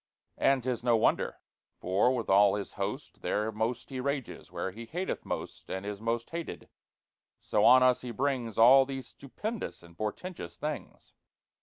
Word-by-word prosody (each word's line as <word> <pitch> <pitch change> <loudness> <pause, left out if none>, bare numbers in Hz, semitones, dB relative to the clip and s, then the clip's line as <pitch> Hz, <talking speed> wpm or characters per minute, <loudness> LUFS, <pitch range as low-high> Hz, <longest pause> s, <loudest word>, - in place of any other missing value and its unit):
And 135 -2 +3
'tis 125 -2 -2
no 120 -2 +4
wonder; - - +1 0.4
for, 95 +7 +2
with 115 -3 -3
all 100 0 +5
his 100 -1 -4
host, 105 +8 -5
There 105 +1 0
most 110 +3 -2
he 130 - -4
rages 140 -1 -3
where 95 - -3
he 115 +4 -9
hateth 180 +7 -3
most, - - -5
And 95 +1 -4
is 105 0 -5
most 115 +1 -2
hated; 170 0 -6 0.7
so - - +1
on 130 0 +8
us 125 -1 +4
he 125 - -6
brings 120 -2 -1
All 130 +4 +8
these 135 -1 -5
stupendous 210 - -6
and 85 0 -16
portentous 105 - -5
things!" 150 -9 -6
120 Hz, 165 wpm, -30 LUFS, 105-135 Hz, 0.7 s, on